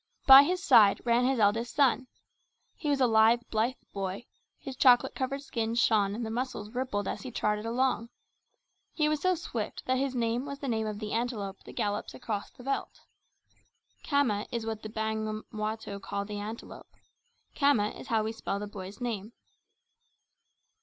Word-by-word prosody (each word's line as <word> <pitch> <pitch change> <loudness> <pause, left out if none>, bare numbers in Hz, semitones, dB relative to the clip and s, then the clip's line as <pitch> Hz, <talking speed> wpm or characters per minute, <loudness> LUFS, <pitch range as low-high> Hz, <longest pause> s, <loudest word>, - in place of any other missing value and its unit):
By 270 0 +11
his 360 +6 -1
side 225 - +6
ran 240 +1 +3
his 265 0 +2
eldest 225 +3 +1
son. 260 -2 +3 0.7
He 300 - -4
was 285 -1 +2
a 260 - +5
lithe, 225 +1 +5
blithe 230 +4 +1 0.2
boy; 195 +3 -4 0.3
his 270 - -8
chocolate 250 -2 +5
coloured 275 +2 -3
skin 230 -4 -2
shone 210 -4 +3
and 235 +1 -3
the 220 - -4
muscles 235 -3 -4
rippled 245 -5 -2
as - - -4
he 260 - -6
trotted 210 -2 -1
along. 235 -1 0 0.8
He 305 -2 +1
was 305 -1 0
so 370 0 +2
swift 240 -10 -5
that 260 0 +1
his 270 -1 -1
name 235 +1 0
was 280 0 -6
the 280 - -6
name 220 -3 -1
of 210 -1 -4
the 210 0 -5
antelope 225 -5 -3
that - - -10
gallops 205 0 -2
across 220 -5 -4
the 245 - -15
veldt. 275 +2 -3 1.0
Cama 250 -8 +1
is 235 -2 -3
what 220 -1 -4
the 215 - -7
Bamangwato 215 -1 -4
call 200 +1 -4
the 205 0 -5
antelope. 215 +3 -8 0.6
Khama 280 -8 +3
is - - -10
how 225 -3 +1
we 220 - -2
spell 225 -3 -4
the 205 - -4
boy's 200 0 -9
name. 225 -2 -4
230 Hz, 175 wpm, -29 LUFS, 210-260 Hz, 1.0 s, By